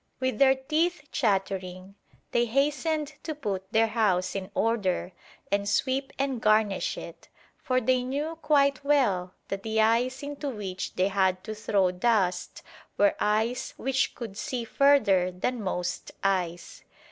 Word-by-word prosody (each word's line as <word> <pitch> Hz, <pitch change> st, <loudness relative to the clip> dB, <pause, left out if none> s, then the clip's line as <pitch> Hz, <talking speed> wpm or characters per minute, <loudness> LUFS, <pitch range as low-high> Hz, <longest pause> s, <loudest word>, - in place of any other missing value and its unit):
With 260 Hz, +1 st, -1 dB
their 265 Hz, -1 st, +6 dB
teeth 305 Hz, +4 st, -1 dB
chattering, 190 Hz, -4 st, -1 dB, 0.4 s
they 240 Hz, 0 st, +2 dB
hastened 295 Hz, +4 st, 0 dB
to 315 Hz, -, -5 dB
put 195 Hz, -8 st, -4 dB
their 225 Hz, +1 st, +4 dB
house 205 Hz, -5 st, +1 dB
in 190 Hz, -1 st, -4 dB
order 200 Hz, -5 st, 0 dB, 0.4 s
and 200 Hz, 0 st, +1 dB
sweep 265 Hz, +5 st, 0 dB
and 270 Hz, -4 st, -1 dB
garnish 215 Hz, -2 st, +2 dB
it, -, -, -10 dB, 0.3 s
for 255 Hz, -1 st, +1 dB
they 255 Hz, +1 st, +2 dB
knew 285 Hz, +6 st, -3 dB
quite 280 Hz, -3 st, +3 dB
well 205 Hz, -11 st, +1 dB
that 195 Hz, 0 st, -3 dB
the 220 Hz, +1 st, -1 dB
eyes 240 Hz, +5 st, +2 dB
into 285 Hz, 0 st, -4 dB
which 195 Hz, -6 st, -5 dB
they 185 Hz, +2 st, +2 dB
had 190 Hz, -1 st, +1 dB
to 220 Hz, -, -5 dB
throw 200 Hz, -3 st, +1 dB
dust 185 Hz, -2 st, 0 dB, 0.3 s
were 205 Hz, 0 st, +4 dB
eyes 220 Hz, +4 st, 0 dB
which 270 Hz, 0 st, 0 dB
could 215 Hz, -4 st, -7 dB
see 245 Hz, +1 st, -3 dB
further 230 Hz, -10 st, +4 dB
than 225 Hz, +7 st, -2 dB
most 180 Hz, -2 st, -3 dB
eyes. 180 Hz, -3 st, -1 dB
220 Hz, 145 wpm, -27 LUFS, 195-270 Hz, 0.4 s, their